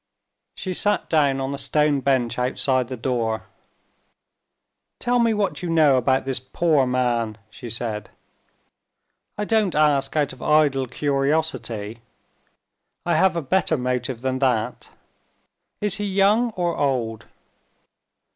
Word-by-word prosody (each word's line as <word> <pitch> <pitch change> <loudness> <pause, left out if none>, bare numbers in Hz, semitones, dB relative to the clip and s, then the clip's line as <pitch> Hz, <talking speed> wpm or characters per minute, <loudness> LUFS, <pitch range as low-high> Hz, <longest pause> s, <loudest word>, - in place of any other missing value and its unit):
She 185 - -4
sat 205 +3 0
down 140 -4 +3
on 135 +1 -3
a 140 - -5
stone 150 0 +2
bench 130 -3 0
outside 130 0 +1
the 130 0 -6
door. 115 -2 -2 1.5
"Tell 245 0 +1
me 230 -1 +3
what 210 -3 -1
you 175 - -4
know 155 -4 +4
about 130 +2 +1
this 135 -2 -1
poor 140 +1 +1
man?" 120 -4 0
she 120 - -9
said. 110 -2 -4 1.3
"I 210 - -2
don't 215 -5 +1
ask 150 -2 +2
out 145 -2 +1
of - - -15
idle 145 -4 +2
curiosity 135 -6 -1 1.1
I 170 -1 +1
have 185 +1 +3
a 165 - -2
better 165 +1 +1
motive 125 -1 -2
than 130 0 -1
that. 125 -5 -1 0.9
Is 210 -1 0
he 205 - -3
young 200 +5 +3
or 175 -2 -1
old?" 120 -6 -1
135 Hz, 130 wpm, -23 LUFS, 125-170 Hz, 1.5 s, know